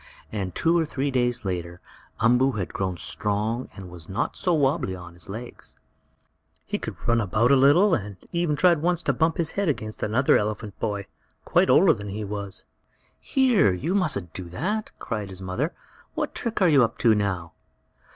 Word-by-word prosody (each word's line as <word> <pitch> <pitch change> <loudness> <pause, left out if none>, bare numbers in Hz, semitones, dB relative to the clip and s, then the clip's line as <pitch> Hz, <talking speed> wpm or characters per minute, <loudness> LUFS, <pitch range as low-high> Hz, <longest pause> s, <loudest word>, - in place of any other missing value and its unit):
And 95 -4 -4
two 165 +1 +2
or - - +2
three 140 -2 -2
days 120 -3 0
later 85 -1 -4 0.4
Umboo 125 +4 +3
had 100 -6 -4
grown 95 -2 -2
stronger 105 +8 -2
and 95 -2 -9
was 85 -2 -11
not 95 - -2
so 180 - 0
wobbly 135 - +1
on 90 -1 -10
his 85 +1 -9
legs. 115 +5 -8 0.9
He - - -3
could - - -5
run 115 0 +3
about 110 +5 +2
a - - +7
little, 145 +9 +5
and 105 -3 -2
once - - -24
he 170 - -1
even 155 -4 +1
tried 170 -1 +4
to 175 -4 +1
bump 160 +5 +1
his 165 -2 0
head 200 -4 0
against 110 -6 -4
another 125 +6 +3
elephant 105 -1 -4
boy, 100 -3 -2 0.4
quite - - +3
older - - +6
than 105 0 -7
he 105 +2 -4
was. 100 -1 -6 0.6
"Here! 245 - +3
You 150 - -2
mustn't 145 - 0
do 95 - -6
that!" 205 - -2
cried 105 -4 -4
his 95 0 -7
mother. 110 - -2 0.4
"What - - -2
trick 225 -4 -2
are - - +6
you 145 -5 +6
up 115 0 -1
to 115 -2 +4
now?" 95 -6 -2
115 Hz, 190 wpm, -25 LUFS, 95-150 Hz, 0.9 s, a